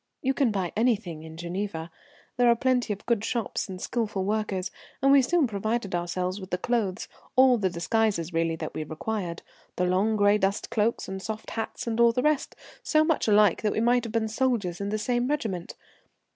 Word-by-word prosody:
You 265 0 +2
can 270 -3 +2
buy 190 -5 -2
anything 215 -9 0
in 160 0 -10
Geneva. 170 -1 -4 0.4
There 245 -1 +4
are 235 - +6
plenty 250 -1 +1
of 205 0 -5
good 235 -3 +1
shops 230 -5 -2
and 185 -1 -6
skilful 210 -3 -2
workers, 200 -3 -1 0.3
and 275 +1 +4
we 280 -1 +7
soon 330 +4 +2
provided 215 -1 -2
ourselves 180 +2 -2
with 185 - -8
the 180 - -1
clothes, 205 -3 -1 0.3
all 255 -1 +6
the 190 -2 +1
disguises 180 0 0
really 165 0 +1
that - - -6
we 155 - -3
required 170 +2 -4 0.3
the 180 - +1
long 190 +5 +2
gray 205 0 +4
dust 195 +1 -1
cloaks 220 +1 0
and 190 0 -5
soft 220 +2 -6
hats 225 - -4
and 230 -1 -2
all 235 0 +6
the 250 - 0
rest, 300 -2 +1 0.3
so 310 -1 +3
much 315 -5 +1
alike 210 -3 +4
that 210 - 0
we - - -1
might 240 +1 +3
have 230 - -5
been 225 -1 +1
soldiers 220 -6 -1
in 200 - -2
the 215 - -1
same 240 +3 0
regiment. 220 - -3
210 Hz, 200 wpm, -27 LUFS, 185-235 Hz, 0.4 s, we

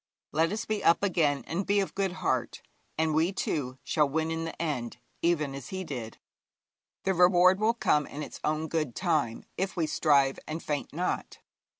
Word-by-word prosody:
Let 165 +3 +2
us 220 +2 -3
be 215 -2 -2
up 170 - +4
again 155 -7 +2
and 170 +5 -2
be 205 +1 +2
of 195 - -1
good 195 -1 0
heart, 185 -1 -2 0.3
and 160 0 +1
we, 160 +4 +2
too, 140 -9 -2
shall 150 -3 +2
win 160 +2 0
in 165 0 -2
the 165 - -7
end, 140 -9 -2 0.2
even 155 -5 +1
as 140 -2 -7
he 190 0 -4
did. 120 -9 -6 0.9
The 190 - +2
reward 180 +1 +5
will 225 +2 +2
come 150 -10 +2
in 150 +2 -6
its - - -8
own 155 +1 0
good 155 -7 -2
time 155 -11 0
if 190 +1 -2
we 165 - +2
strive 145 -3 +3
and 155 +2 -4
faint 145 -2 -3
not. 175 +5 -2
160 Hz, 190 wpm, -29 LUFS, 150-185 Hz, 0.9 s, reward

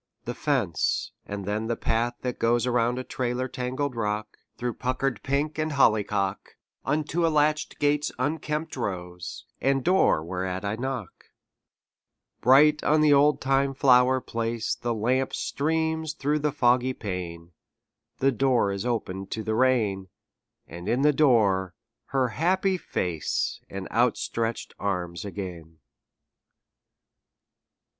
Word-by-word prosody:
The 120 - -3
fence; 125 - 0 0.2
and 100 -1 -5
then 105 +2 -2
the 115 - 0
path 120 +2 0
that 125 -1 -3
goes 120 +1 +2
Around 120 0 +1
a 130 - -3
trailer 125 0 -2
tangled 130 +1 -3
rock, 105 -1 -2 0.2
Through 120 -1 -2
puckered 130 -1 -2
pink 145 +3 -1
and 155 -1 -1
hollyhock, 105 -7 +1 0.3
Unto 155 +4 0
a 165 - +4
latch 150 0 +1
gate's 145 0 +1
unkempt 150 +3 -2
rose, 90 -7 -5 0.2
And 135 -1 +2
door 180 - +3
whereat 95 +2 -3
I 100 +2 -1
knock. 125 -5 -5 1.2
Bright 145 +4 +5
on 155 +1 +3
the 150 -1 +5
oldtime 140 -1 +3
flower 130 -1 +5
place 115 -1 -2
The 120 -1 -2
lamp 130 +5 0
streams 160 +1 -1
through 150 +1 0
the 150 0 0
foggy 125 0 +2
pane; 90 -6 -6 0.7
The 135 +1 +3
door 125 -4 +2
is 100 +4 -3
opened 95 -5 -3
to 110 - -4
the 110 - -1
rain: 110 -6 +2 0.6
And 85 +3 -7
in 125 +4 +1
the 150 0 +5
door 100 - +3 0.3
her 130 -2 0
happy 185 - +1
face 90 - -2
And 95 -1 -6
outstretched 115 -1 0
arms 90 -4 -2
again. 90 -5 -7
125 Hz, 130 wpm, -26 LUFS, 100-140 Hz, 1.2 s, Bright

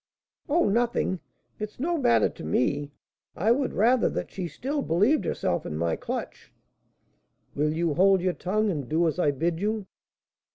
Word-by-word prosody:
"Oh, 335 +4 +3
nothing; 230 -3 +1 0.4
it's 215 +2 -6
no 340 +6 0
matter 115 - +3
to - - -10
me; 140 - 0 0.5
I 215 +6 +2
would 265 +2 +1
rather 235 +3 +3
that - - -4
she 185 -3 -4
still 280 - -3
believed 210 - +2
herself - - -1
in 75 - -5
my 85 0 0
clutch - - -6 0.5
" - - -42
"Will 150 +1 +1
you 165 0 0
hold 190 +4 +4
your 180 0 0
tongue, 210 +4 0
and 145 -7 -4
do 165 +2 +2
as 160 +2 -2
I 150 - +3
bid 165 +4 -1
you?" 210 +1 -1
185 Hz, 170 wpm, -26 LUFS, 155-225 Hz, 0.5 s, hold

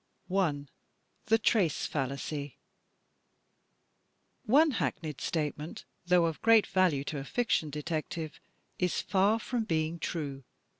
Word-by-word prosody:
I. 150 -7 +1 0.6
The 225 +1 +5
'"Trace" 210 -7 +2
Fallacy 140 +1 -3 1.9
One 300 +7 +5
hackneyed 155 - -3
statement, 150 0 -3 0.2
though 175 -1 +5
of 165 -2 -3
great 225 -3 +6
value 180 -7 +2
to 145 0 -4
a - - -5
fiction 205 - 0
detective, 155 +1 -4 0.4
is 180 -2 +1
far 200 +3 +3
from 230 0 -2
being 160 -1 -1
true. 140 -5 -4
165 Hz, 110 wpm, -30 LUFS, 150-200 Hz, 1.9 s, great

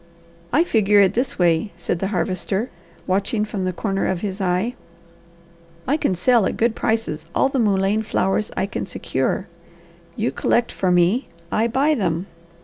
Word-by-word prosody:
"I 300 +6 +4
figure 210 - +3
it 195 -1 +5
this 245 +4 -1
way," 175 +3 +2
said 175 0 -2
the 195 - -1
Harvester, 195 +2 -2 0.3
watching 200 +3 0
from 200 -3 -3
the 185 - 0
corner 195 +1 -1
of 185 -2 -1
his 200 -1 -3
eye. 185 +6 0 1.1
"I 275 - +3
can 195 -11 0
sell 220 +3 +3
at - - -3
good 230 0 +2
prices 220 -10 -1
all 270 - +3
the 270 - -1
mullein 200 -1 +2
flowers 210 -1 0
I - - +1
can 195 - -4
secure. 170 +1 -2 0.7
You 225 +2 0
collect 240 0 +1
for 185 - -1
me, 180 +8 +3 0.2
I 225 +2 +2
buy 275 +6 +2
them. 180 - -1
200 Hz, 165 wpm, -22 LUFS, 185-225 Hz, 1.1 s, it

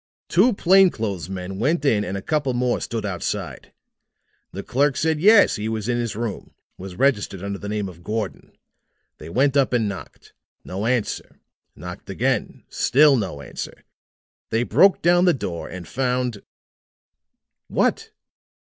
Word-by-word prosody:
"Two 200 +9 +4
plain 190 0 +5
clothes 100 - -4
men 95 0 -6
went 150 +6 +1
in 105 -7 +3
and 100 -1 -4
a 100 - -7
couple 145 -5 0
more 125 0 0
stood 115 -2 -4
outside. 95 -4 -4 0.8
The 100 - -6
clerk 140 +2 +1
said 160 -1 +1
yes, 210 +2 +6
he 105 +1 -3
was 110 -1 -3
in 120 -1 0
his 115 -3 -3
room. 115 -2 -5 0.2
Was 95 -1 -9
registered 105 -7 0
under 100 0 -4
the 100 - -6
name 105 -1 -2
of 85 -2 -11
Gordon. 105 0 -5 0.6
They 75 - -9
went 135 +8 +2
up 135 -3 +2
and 115 -3 +2
knocked. 100 -2 -9 0.3
No 100 +4 -4
answer. 125 -3 -2 0.4
Knocked - - -9
again. - - -1
Still 145 +1 +4
no 95 - -3
answer. - - -8 0.7
They 115 +2 +1
broke 195 +9 +4
down 175 +1 +4
the 175 - +4
door, 85 -10 -5
and 90 -3 -8
found 125 -4 -1 0.6
" - - -61
"What?" - - 0
115 Hz, 155 wpm, -22 LUFS, 100-140 Hz, 0.8 s, yes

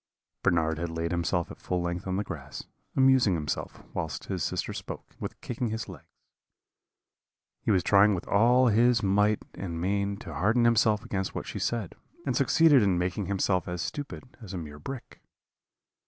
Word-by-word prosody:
"Bernard 80 -3 +1
had 85 0 -2
laid 85 +1 -3
himself 85 0 0
at - - -11
full 90 - -1
length 85 +2 -3
on 95 - -1
the 100 - 0
grass, - - -7 0.3
amusing 130 -7 +5
himself, 75 -2 -4
whilst 80 -3 -3
his - - -3
sister - - -2
spoke, - - -8
with - - -6
kicking 120 0 -3
his 110 +1 -4
legs. 90 -7 -11 1.5
He - - -3
was 95 -4 +3
trying 100 0 +5
with 85 - -6
all 120 +5 +5
his 120 +2 +4
might 105 +2 +2
and 85 -4 -5
main 100 +2 0
to 85 - -9
harden 110 +10 +2
himself 110 -2 +3
against 95 -1 -3
what - - -3
she - - -5
said; 115 -7 -2 0.3
and 130 -3 0
succeeded 145 +1 +5
in 95 -4 +2
making 90 +2 -1
himself 95 -2 0
as 90 0 -3
stupid 145 -2 -5 0.2
as 100 -4 -7
a - - -3
mere 75 -3 -7
brick. 125 - -8
100 Hz, 175 wpm, -28 LUFS, 90-115 Hz, 1.5 s, amusing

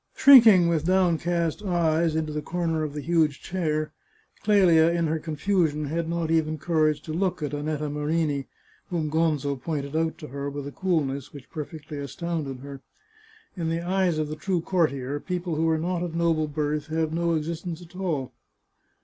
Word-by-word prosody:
Shrinking, 225 -10 +8
with 165 -1 0
downcast 175 -2 +1
eyes, 170 -4 +1
into 155 -1 -1
the 150 - -2
corner 165 -1 -1
of 150 -1 -3
the 150 - -3
huge 155 -2 +1
chair, 155 -4 -2 0.5
Clelia, 180 -6 +5
in 170 0 +1
her 160 0 0
confusion, 155 -1 0
had 165 +3 -2
not 170 -1 -1
even 155 -1 +1
courage 155 -2 +1
to 155 - -5
look 180 -1 -1
at 150 - -3
Annetta 150 +1 -2
Marini, 150 -1 -1 0.4
whom 160 -4 -2
Gonzo 150 -3 +1
pointed 145 -1 -3
out 160 0 0
to 150 - -9
her 140 +1 -4
with 140 0 -6
a 140 - -6
coolness 145 -7 -1
which 140 -3 -12
perfectly 150 -1 -7
astounded 145 -2 -4
her. 140 -1 -9 0.7
In 165 -3 -2
the 165 +1 -1
eyes 185 -3 +1
of 155 -1 -1
the 155 - -4
true 175 +3 -1
courtier, 145 -6 0
people 180 0 -3
who 160 +1 +1
are 160 - +2
not 175 +2 -2
of 175 -2 -4
noble 165 -2 +1
birth 150 0 -2
have 160 0 -1
no 170 0 +1
ex 155 -1 -1
istence 170 +1 -5
at 175 +1 -16
all. 165 -9 -2
160 Hz, 180 wpm, -26 LUFS, 150-170 Hz, 0.7 s, Shrinking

